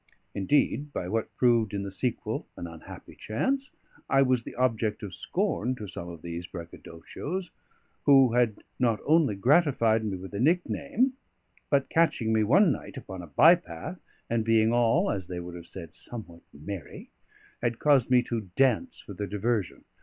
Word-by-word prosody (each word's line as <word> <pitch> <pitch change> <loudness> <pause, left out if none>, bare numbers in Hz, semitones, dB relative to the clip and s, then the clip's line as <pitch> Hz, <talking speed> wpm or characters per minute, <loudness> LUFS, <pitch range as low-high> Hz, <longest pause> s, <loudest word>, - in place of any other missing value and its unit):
Indeed, 145 +7 +1
by 90 - -4
what 110 +3 -2
proved 115 -4 +2
in 100 - -2
the 100 - -5
sequel 120 +5 -3
an - - -5
unhappy 80 -1 -11
chance, 265 - -1 0.4
I 135 0 +5
was 125 -3 +1
an - - -7
object 115 -4 0
of 100 -3 -6
scorn 125 +8 -1
to 110 - -7
some 90 -2 -7
of 85 -2 -10
these 85 +1 -5
braggadocios; 85 - -7 0.5
who 135 -4 +6
had 120 -4 +1 0.2
not 115 -4 +2
only 155 -8 +3
gratified 115 - +3
me 100 -3 -2
with 95 +2 -10
a 100 - -3
nickname, 180 - +1 0.6
but 140 -2 +2
catching 150 -9 +2
me 110 - +3
one 165 - +5
night - - -6
upon 95 -1 -7
a 85 - -10
by 155 - +7
path, 180 +1 -6 0.3
and 115 -1 0
being 115 0 +3
all 120 - +3
(as 95 -3 -4
they 90 -1 -5
would 90 0 -7
have 85 -1 -10
said) 85 -4 -9
somewhat 90 -8 -7
merry, 80 +3 -8 0.5
had 120 -1 0
caused 140 -5 +3
me 125 -1 +5
to 115 -6 -4
dance 135 - +2
for 100 - -10
their 100 +2 -4
diversion. 105 0 -2
115 Hz, 170 wpm, -28 LUFS, 95-135 Hz, 0.6 s, by